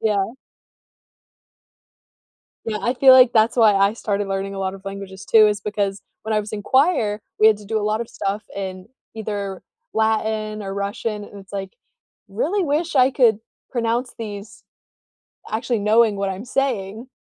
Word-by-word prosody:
Yeah. 210 0 0 2.3
Yeah 215 -1 -2
I 240 - 0
feel 265 +1 +7
like 255 -2 +7
that's 225 +2 +3
why 220 -3 +6
I 200 +1 +3
started 205 -3 -2
learning 195 0 -3
a - - -6
lot 190 0 -2
of 195 0 -13
languages 195 0 -8
too 220 -1 +6
is 205 -1 0
because 205 -2 -2 0.2
when 220 - -3
I 215 - +2
was 210 +1 -9
in 205 - -4
choir 240 - +2 0.2
we 215 - +7
had 220 -1 +6
to 210 - -13
do 220 +2 -1
a 210 - -3
lot 215 +2 0
of 235 - -5
stuff 200 +2 -3
in 185 -2 -6 0.3
either 205 -3 -4 0.3
Latin 220 -1 0
or 195 -1 -5
Russian 205 +1 -3
and 205 - -12
it's 195 0 -15
like, 195 -1 -5 0.6
"Really 410 -4 -1
wish 320 +1 -1
I 260 0 +5
could 240 -6 +3 0.3
pronounce 240 0 -1
these 210 -1 -8 0.9
actually 230 +1 -1
knowing 215 +1 +3
what 195 0 -2
I'm 195 +5 -6
saying." 235 -4 -2
215 Hz, 170 wpm, -21 LUFS, 200-230 Hz, 2.3 s, feel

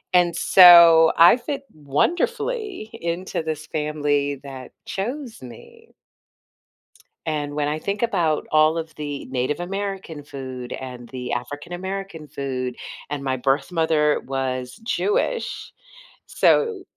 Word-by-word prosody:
and 175 -1 +4
so, 170 -3 +8
I 170 +8 +8
fit 275 +3 -5
wonderfully 350 - -1
into 170 +2 -3
this 155 -1 -4
family 145 -2 -1
that 135 -2 -9
chose 240 - -5
me 460 - -13 1.4
and 145 -2 -2
when 145 -1 -1
I 150 +1 -2
think 200 +6 -4
about 175 -10 0
all 155 +1 +4
of 160 -1 -6
the 145 -2 -5
Native 130 +4 -2
American 195 -4 -5
food 130 -3 -8
and 125 -2 -8
the 125 -1 -6
African 145 +7 -5
American 190 -3 -6
food, 130 -3 -4 0.3
and 140 -2 -4
my 130 -1 0
birth 135 +5 0
mother 160 -3 +2
was 130 -1 -3
Jewish, 210 - -1 0.6
so 445 -5 +2
155 Hz, 120 wpm, -22 LUFS, 140-190 Hz, 1.4 s, so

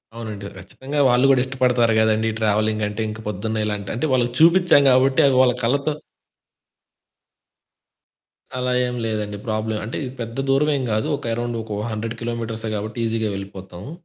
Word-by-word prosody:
అవునండి. 105 -3 -6
ఖచ్చితంగా 140 +3 -6
వాళ్ళు 125 +2 +4
గూడా 130 -2 +5
ఇష్టపడతారు 125 -3 +2
గదండీ! 110 0 +2
ట్రావెలింగంటే. 110 0 0
ఇంక 110 +1 -7
పొద్దున్న 110 +2 -2
ఇలాంటి 105 -2 -4
అంటే, 125 +6 -1
వాళ్ళకి 120 -2 +1
చూపిచ్చ్చాం 170 -2 +6
గాబట్టి, 130 +1 +4
అవి 135 - +2
వాళ్ళ 125 -2 +4
కళ్ళతో 140 +5 +1 2.6
అలా 125 0 -1 0.2
ఏం 125 - -4
లేదండి 105 -2 -3
ప్రాబ్లమ్. 110 0 -2
అంటే, 115 - -5
ఇది 125 - -6
పెద్ద 115 +1 -6
దూరవేం 140 0 +2
గాదు. 110 +1 0
ఒక - - -7
అరౌండొకొ 115 -3 -4
100 110 +1 -4
కిలోమీటర్సే 115 -1 -4
గాబట్టి 110 +2 -5
ఈజీగా 110 -1 -1
వెళ్ళిపోతాము. 95 +1 -9
115 Hz, 140 wpm, -22 LUFS, 110-125 Hz, 2.6 s, చూపిచ్చ్చాం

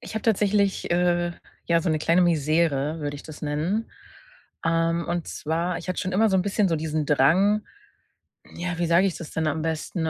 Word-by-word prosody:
ich - - -9
habe 220 - -3
tatsächlich, 205 -2 +1
äh, 175 0 +1 0.3
ja, 170 0 +3
so 170 - 0
'ne 155 - +1
kleine 170 +4 +3
Misere, 155 -2 +1
würde 145 -1 -3
ich 145 - -11
das 155 -1 -11
nennen. 155 +9 -2 0.7
Ähm, 165 0 +1
und 175 -1 -2
zwar, 165 +3 -2
ich - - -10
hatte 185 - -2
schon 185 - -3
immer 215 +3 +3
so 190 - +3
'n - - +3
bisschen 200 +2 +1
so 165 - +1
diesen 155 0 -2
Drang 185 +10 +3 0.9
Ja, 175 0 -3
wie 175 - +1
sage 170 +4 +4
ich 185 - -3
das 165 - -9
denn 160 - -1
am 155 +1 -1
besten? 160 +1 -2
170 Hz, 200 wpm, -25 LUFS, 155-185 Hz, 0.9 s, sage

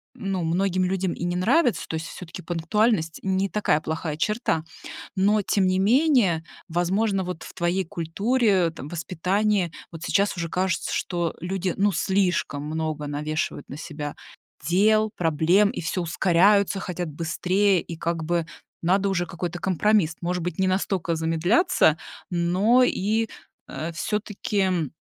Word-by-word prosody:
ну, 195 -7 -2
многим 185 +2 +1
людям 185 -1 0
и - - -6
не 175 0 -1
нравится. 235 - +2
То - - -6
есть 160 +1 -3
все-таки 180 +1 -9
пунктуальность- 170 +1 0
не 190 0 +1
такая 195 -7 +1
плохая 155 -1 -4
черта. 210 -4 0 0.5
Но 205 +2 +3
тем 195 0 +1
не 185 0 +2
менее, 225 - +3 0.2
возможно, 190 +4 0
вот 180 -2 -5
в - - -9
твоей 180 +1 0
культуре, 190 +3 +1
там, 150 -3 -9
воспитании 185 +3 0 0.2
вот 165 -1 -10
сейчас 200 -1 +1
уже 170 -1 -3
кажется, 185 +3 -1
что 175 -3 -1
люди, 185 0 -2
ну, 205 +1 +3
слишком 180 -6 0
много 155 -1 -3
навешивают 150 0 -3
на 140 - -7
себя 150 -2 -6 0.5
дел, 215 +6 +3
проблем 175 +5 +3
и - - -5
всё 170 +2 -2
ускоряются, 190 +4 +3
хотят 175 -2 -4
быстрее, 180 +4 +1
и 165 - -8
как 165 0 -2
бы 170 0 0 0.4
надо 190 +3 +2
уже 175 -2 0
какой-то 175 +1 -5
компромисс. 190 -2 +2
Может 180 0 -2
быть, 175 -1 -4
не 190 - +3
настолько 185 -3 0
замедляться, 165 - +3 0.3
но 185 +9 +3
и, 220 +1 0 0.4
э, 160 +2 -4
всё-таки 190 - -1
180 Hz, 145 wpm, -24 LUFS, 165-200 Hz, 0.5 s, Но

